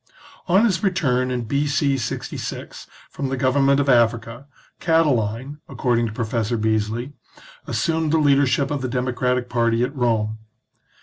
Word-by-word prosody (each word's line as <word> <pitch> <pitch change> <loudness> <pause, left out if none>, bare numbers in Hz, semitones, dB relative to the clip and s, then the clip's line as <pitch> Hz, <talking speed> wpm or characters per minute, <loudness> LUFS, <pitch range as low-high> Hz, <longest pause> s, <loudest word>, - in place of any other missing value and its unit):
On 190 +5 +4
his 190 -6 +1
return 130 -10 +1
in 125 -1 -2
B.C. 140 +3 0
(^ 130 - -5 0.2
from 135 -2 -4
the 135 - -2
government 135 +2 +3
of 140 - 0
Africa, 120 +1 +1 0.3
Catiline, 140 -4 0
according 120 -2 0
to - - -6
Professor 115 +1 -2
Bee§ly, 110 +4 -1 0.5
as - - -2
sumed 160 -2 0
the 160 - +3
leadership 140 -2 +2
of 145 -2 -2
the 130 - -2
democratic 125 0 -1
party 115 -1 +1
at 135 +4 -3
Rome. 110 -4 0
125 Hz, 140 wpm, -22 LUFS, 115-145 Hz, 0.5 s, On